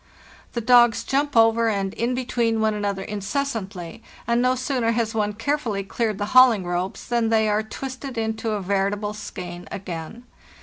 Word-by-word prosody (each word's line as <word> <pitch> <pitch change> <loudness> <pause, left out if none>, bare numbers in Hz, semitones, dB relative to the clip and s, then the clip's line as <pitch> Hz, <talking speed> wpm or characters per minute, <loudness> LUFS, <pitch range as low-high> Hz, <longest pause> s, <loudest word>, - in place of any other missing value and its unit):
The 235 - -2
dogs 240 0 +5
jump 280 -1 0
over 225 0 +5
and 195 -2 -1
in 240 +2 -1
between 235 -3 0
one 220 0 +2
another 200 -2 -2
incessantly, 205 - -4 0.2
and 235 0 +2
no 255 +1 +3
sooner 255 -3 0
has 225 -1 -1
one 210 -1 0
carefully 225 -3 -1
cleared 215 +1 -2
the 205 - -2
hauling 250 -7 +6
ropes 175 +2 -3
than 235 -2 +1
they 220 -1 +3
are 210 0 +2
twisted 260 +3 -7
into 220 0 -2
a 205 - -2
veritable 200 +2 -1
skein 180 -4 -8
again. 185 +4 -6
220 Hz, 165 wpm, -23 LUFS, 200-240 Hz, 0.2 s, hauling